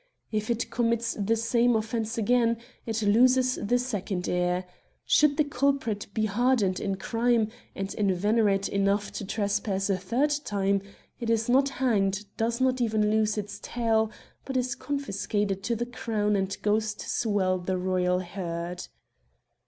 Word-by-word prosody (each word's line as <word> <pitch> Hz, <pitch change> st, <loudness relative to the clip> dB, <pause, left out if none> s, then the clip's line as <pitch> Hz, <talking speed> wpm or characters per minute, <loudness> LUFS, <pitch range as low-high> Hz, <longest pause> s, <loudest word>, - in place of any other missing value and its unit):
If 215 Hz, 0 st, -2 dB
it 235 Hz, 0 st, -1 dB
commits 230 Hz, -1 st, +1 dB
the 215 Hz, +2 st, 0 dB
same 235 Hz, +1 st, +2 dB
offence 225 Hz, +1 st, -2 dB
again, 230 Hz, +1 st, +2 dB, 0.3 s
it 225 Hz, -1 st, -1 dB
loses 255 Hz, +4 st, +4 dB
the 240 Hz, +4 st, +2 dB
second 205 Hz, -7 st, -3 dB
ear; 180 Hz, +1 st, 0 dB, 0.4 s
should 300 Hz, -1 st, +4 dB
the 305 Hz, -, +4 dB
culprit 275 Hz, -6 st, 0 dB
be 215 Hz, +1 st, 0 dB
hardened 215 Hz, -3 st, +2 dB
in 195 Hz, -2 st, -1 dB
crime, 230 Hz, +2 st, +1 dB, 0.3 s
and 195 Hz, 0 st, -4 dB
in 200 Hz, -2 st, +1 dB
veterate 200 Hz, +1 st, +2 dB
enough 200 Hz, +1 st, 0 dB
to -, -, -5 dB
trepass 200 Hz, -1 st, -1 dB
a 190 Hz, -, +1 dB
third 245 Hz, +11 st, +1 dB
time, 200 Hz, -3 st, 0 dB, 0.4 s
it 235 Hz, -2 st, -3 dB
is 225 Hz, -1 st, +1 dB
not 270 Hz, +3 st, +4 dB
hanged, 210 Hz, -6 st, 0 dB
does 230 Hz, +2 st, -1 dB
not 260 Hz, -1 st, +2 dB
even 215 Hz, -2 st, +2 dB
lose 215 Hz, 0 st, +1 dB
its 205 Hz, 0 st, -5 dB
tail, 225 Hz, -2 st, +1 dB, 0.3 s
but 265 Hz, -1 st, -3 dB
is 250 Hz, 0 st, 0 dB
confiscated 205 Hz, -8 st, -2 dB
to 235 Hz, -, 0 dB
the 240 Hz, +2 st, -2 dB
Crown 215 Hz, -3 st, -1 dB
and 195 Hz, -1 st, -1 dB
goes 215 Hz, +1 st, +1 dB
to -, -, -8 dB
swell 195 Hz, -5 st, +1 dB
the 185 Hz, +1 st, -2 dB
royal 180 Hz, 0 st, +1 dB
herd. 175 Hz, -1 st, -5 dB
215 Hz, 155 wpm, -27 LUFS, 195-235 Hz, 0.4 s, loses